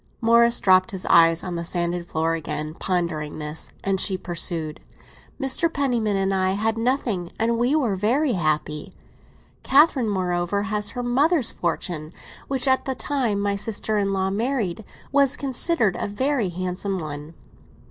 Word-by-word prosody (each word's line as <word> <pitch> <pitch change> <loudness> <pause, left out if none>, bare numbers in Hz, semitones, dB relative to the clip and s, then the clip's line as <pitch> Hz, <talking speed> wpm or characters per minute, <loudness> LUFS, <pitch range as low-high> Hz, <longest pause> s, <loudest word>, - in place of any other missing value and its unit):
Morris 235 +1 +4
dropped 185 -1 +4
his 190 -2 -5
eyes 165 -1 +6
on 180 - -4
the 170 0 -3
sanded 175 0 -2
floor 160 0 0
again, 155 -1 -4
pondering 170 -4 -2
this; 150 +1 -5
and 195 -1 0
she 190 -2 0
pursued. 170 -3 -2 0.6
"Mr. 295 +5 +1
Penniman 240 -9 0
and 195 0 +1
I 190 0 +1
had 220 +3 0
nothing, 225 -7 -1
and 230 +1 +1
we 245 +5 +2
were 245 -10 +1
very 250 +9 +1
happy. 155 -5 -1 0.7
Catherine, 270 -4 +4
moreover, 180 0 0
has 210 -1 -2
her 245 - -2
mother's 270 +3 +2
fortune, 165 -2 -3 0.3
which, 270 -1 -1
at 260 0 +3
the 265 - -2
time 250 -9 -1
my 200 0 0
sister 210 +1 -2
in 200 -1 0
law 190 0 0
married, 220 -3 -1 0.3
was 280 0 +3
considered 265 - +1
a - - -1
very 245 0 0
handsome 185 +2 -3
one." 155 -1 -7
200 Hz, 155 wpm, -23 LUFS, 175-245 Hz, 0.7 s, eyes